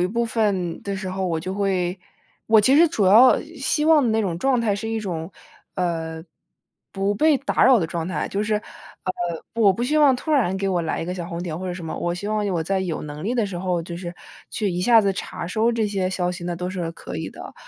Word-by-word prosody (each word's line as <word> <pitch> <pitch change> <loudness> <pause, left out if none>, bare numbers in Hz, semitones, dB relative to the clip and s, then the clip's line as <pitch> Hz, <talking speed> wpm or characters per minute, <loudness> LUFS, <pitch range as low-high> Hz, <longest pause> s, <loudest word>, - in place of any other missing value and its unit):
一 - - +3
部 235 +5 -1
分 200 -7 -1
的 200 -1 -3
时 190 -1 -5
候， 190 0 -2
我 165 -2 -1
就 185 +3 -4
会 185 -2 0 0.5
我 220 -1 +6
其 265 +7 +4
实 335 +3 +7
主 215 - +1
要 225 +7 +7 0.2
希 295 +2 0
望 300 -7 +5
那 225 - +2
种 180 -5 -2
状 255 +3 +2
态 210 -3 +1
是 225 +2 -4
一 225 0 -1
种， 175 -3 -5 0.4
呃， 165 -3 -2 0.7
不 195 +1 0
被 305 +6 +4
打 275 - +1
扰 260 -2 +7
的 165 - 0
状 165 0 -4
态。 185 - -2
就 200 - -1
是， 215 0 0
呃， 190 -3 -7 0.4
我 215 -4 +5
不 230 - -4
希 300 +4 +1
望 285 -3 +6
突 315 - -6
然 225 -10 +2
给 195 0 -1
我 180 -3 0
来 165 - -2
一 - - -3
个 180 +2 -4
小 175 -2 -5
红 170 -1 -5
点， 170 -2 -4
或 185 - -5
者 180 - -2
什 175 -2 -7
么。 160 - -5
我 175 - -1
希 180 +3 -6
望 210 -1 0
我 170 -4 0
在 190 +3 -1
有 180 -4 -3
能 150 +1 -7
力 240 +4 -1
的 230 -4 +1
时 195 - -6
候， 180 -1 -1
就 170 +1 -7
是， 175 -1 -6 0.4
去 210 - -1
一 175 0 -2
下 230 +4 +6
子 200 -2 +1
查 175 - -6
收 220 +6 +1
这 230 -2 0
些 195 -2 -1
消 180 -1 -1
息， 180 0 -8
那 175 0 -2
都 180 +1 -3
是 175 -3 -3
可 - - -8
以 - - -4
的。 - - -10
195 Hz, 275 characters per minute, -23 LUFS, 175-225 Hz, 0.7 s, 实